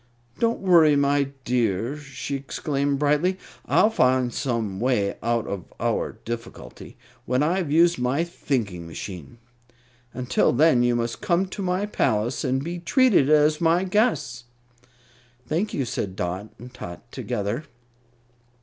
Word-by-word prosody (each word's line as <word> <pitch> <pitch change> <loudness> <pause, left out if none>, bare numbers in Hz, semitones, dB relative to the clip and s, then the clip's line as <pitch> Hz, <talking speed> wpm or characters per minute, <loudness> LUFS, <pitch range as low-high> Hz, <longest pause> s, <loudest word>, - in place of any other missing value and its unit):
"Don't 230 0 +1
worry, 170 -6 +5
my 140 0 +2 0.2
dear," 115 0 0
she 140 -1 -6
exclaimed, 140 +1 -2
brightly, 150 +6 +1 0.3
"I'll 215 - +4
find 130 - +2
some 115 -7 -2
way 115 -5 +1
out 115 -1 0
of 100 -4 -6
our - - -1
difficulty 120 0 -8 0.3
when 125 +3 +2
I 170 +5 +1
have 170 -7 -2
used 170 +1 +4
my 130 +6 +1
thinking 110 - -3
machine. 90 - -8 0.7
Until 125 0 +1
then 140 -1 +4
you 120 0 +2
must 115 -1 -2
come 185 -2 +1
to 200 - -6
my 185 +1 0
palace 120 - 0
and 130 0 0
be 175 +2 -4
treated 195 - +3
as 150 +1 +4
my 170 +2 +3
guests." 155 - 0 1.0
"Thank 175 - -1
you," 135 - -1
said 100 -4 -4
Dot 95 +4 -4
and 125 +2 -12
Tot 120 +1 -10
together. 120 +4 -3
135 Hz, 140 wpm, -24 LUFS, 120-165 Hz, 1.0 s, worry